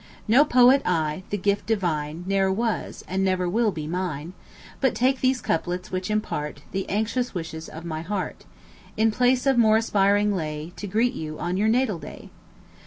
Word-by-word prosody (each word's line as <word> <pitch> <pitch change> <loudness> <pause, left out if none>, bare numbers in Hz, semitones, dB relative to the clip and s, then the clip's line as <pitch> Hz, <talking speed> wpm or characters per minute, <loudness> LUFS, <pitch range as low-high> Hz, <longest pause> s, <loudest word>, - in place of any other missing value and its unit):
No 245 +7 +6
poet 255 -1 +5
I 160 -2 0
the 205 - -1
"gift 200 0 0
divine" 165 -6 -1
Ne'er 195 0 +2
was, 225 +3 -2
and 190 +1 -1
never 185 -1 +1
will 220 +4 +2
be, 155 -4 -5
mine; 170 -1 -3 0.5
But 265 -3 +1
take 260 +2 +1
these 260 0 +2
couplets, 180 +2 -2
which 185 +2 -3
impart 150 -9 -3
The 195 0 -3
anxious 220 +3 -1
wishes 165 -1 -5
of 160 +2 -9
my 160 -2 -4
heart, 190 +2 -4 0.5
In 220 0 +3
place 250 +3 +2
of 270 -3 +3
more 220 -1 +5
aspiring 205 -2 +2
lay, 155 0 -4
To 205 - -5
greet 230 +6 +1
you 155 -7 -6
on 175 +1 -2
your 205 +3 +1
natal 225 -5 +1
day. - - -10
195 Hz, 175 wpm, -25 LUFS, 170-225 Hz, 0.5 s, No